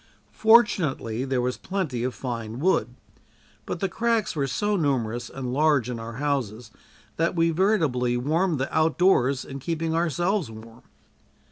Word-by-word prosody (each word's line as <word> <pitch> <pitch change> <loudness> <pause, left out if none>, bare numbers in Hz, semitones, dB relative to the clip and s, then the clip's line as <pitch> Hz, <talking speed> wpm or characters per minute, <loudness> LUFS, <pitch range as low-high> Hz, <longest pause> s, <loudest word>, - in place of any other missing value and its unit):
Fortunately 170 - +3
there 130 -2 0
was 125 0 -1
plenty 165 -12 -3
of 130 0 -2
fine 115 -3 -5
wood, 130 -8 +1 0.7
but 175 - -4
the 195 - +1
cracks 225 0 0
were 140 -3 0
so 205 +9 0
numerous 120 - -1
and 130 -2 -5
large 145 -4 +2
in 120 - -5
our 115 +1 -7
houses 120 -5 -3 0.5
that 165 +2 0
we 165 0 +2
veritably 155 - +1
warmed 160 +6 0
the 135 - -3
outdoors 155 -5 +2
in 135 0 -7
keeping 165 +3 -2
ourselves 175 - 0
warm. 115 +2 -12
140 Hz, 145 wpm, -25 LUFS, 125-175 Hz, 0.7 s, Fortunately